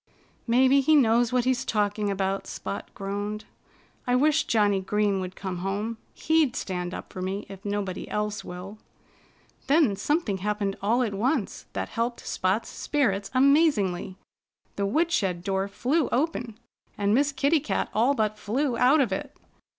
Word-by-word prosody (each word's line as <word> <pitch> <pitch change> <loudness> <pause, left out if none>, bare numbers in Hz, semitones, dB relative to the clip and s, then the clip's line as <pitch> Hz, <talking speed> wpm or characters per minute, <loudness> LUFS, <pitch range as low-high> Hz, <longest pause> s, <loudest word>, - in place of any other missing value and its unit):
"Maybe 260 +4 +5
he 310 +3 +4
knows 240 -3 +4
what 250 -1 +1
he's 255 -1 +1
talking 205 -1 0
about," 195 0 -1
Spot - - -6
groaned. 205 +2 -4 0.6
"I 245 - +3
wish 305 +4 +3
Johnnie 205 -3 +2
Green 205 0 +1
would 185 0 -5
come 190 -2 -5
home. 205 +5 -3 0.2
He'd 315 -5 +2
stand 180 -2 -3
up - - -8
for 185 - -6
me, 195 +2 -3
if 195 0 -10
nobody 205 -3 -3
else 210 0 -2
will." 185 +4 -8 0.9
Then 280 -8 +4
something 215 - 0
happened 205 0 -1
all 230 +5 +2
at 215 -4 -2
once 235 +3 -1
that - - -3
helped 235 0 -3
Spot's 190 +5 -1
spirits 205 -10 -1
amazingly. 255 - +3 0.6
The 200 0 -1
woodshed 205 - 0
door 195 0 -1
flew 260 +9 0
open 250 -5 -1 0.4
and 205 0 +1
Miss 285 +4 +3
Kitty 280 +4 +2
Cat 295 - -1
all 245 +6 +3
but 215 -2 -1
flew 245 +3 -1
out 275 +5 +5
of 240 -7 0
it. 190 - -4
215 Hz, 155 wpm, -26 LUFS, 195-260 Hz, 0.9 s, Maybe